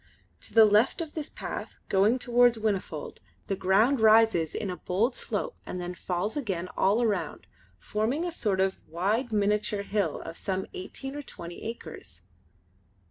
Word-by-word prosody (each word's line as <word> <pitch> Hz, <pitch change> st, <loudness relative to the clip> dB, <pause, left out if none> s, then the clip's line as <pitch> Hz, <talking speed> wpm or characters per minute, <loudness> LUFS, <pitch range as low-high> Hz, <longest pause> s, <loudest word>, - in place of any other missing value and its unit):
To -, -, -9 dB
the 225 Hz, -1 st, +9 dB
left 210 Hz, -, +3 dB
of 325 Hz, -3 st, -4 dB
this 310 Hz, -2 st, -4 dB
path, -, -, -6 dB
going 205 Hz, +6 st, +3 dB
towards 245 Hz, -1 st, +4 dB
Whinnyfold, 200 Hz, -8 st, -3 dB, 0.3 s
the 195 Hz, -, -1 dB
ground 215 Hz, +9 st, +3 dB
rises 220 Hz, -7 st, +5 dB
in 200 Hz, -3 st, -2 dB
a -, -, -4 dB
bold 215 Hz, +8 st, 0 dB
slope -, -, -3 dB
and 180 Hz, -, -5 dB
then 180 Hz, 0 st, -4 dB
falls 180 Hz, +3 st, -2 dB
again 190 Hz, -, -2 dB
all 215 Hz, +5 st, +3 dB
round, 185 Hz, -8 st, -2 dB, 0.3 s
forming 220 Hz, -, -1 dB
a 350 Hz, -, -2 dB
sort 210 Hz, -, -1 dB
of 190 Hz, 0 st, +1 dB
wide 210 Hz, +9 st, 0 dB
miniature 210 Hz, 0 st, +1 dB
hill 200 Hz, -7 st, -1 dB
of 165 Hz, -, -8 dB
some 190 Hz, -1 st, -2 dB
eighteen 270 Hz, +9 st, -6 dB
or 290 Hz, -, -4 dB
twenty 170 Hz, -10 st, -9 dB
acres. 155 Hz, -, -7 dB
210 Hz, 160 wpm, -28 LUFS, 185-235 Hz, 0.3 s, the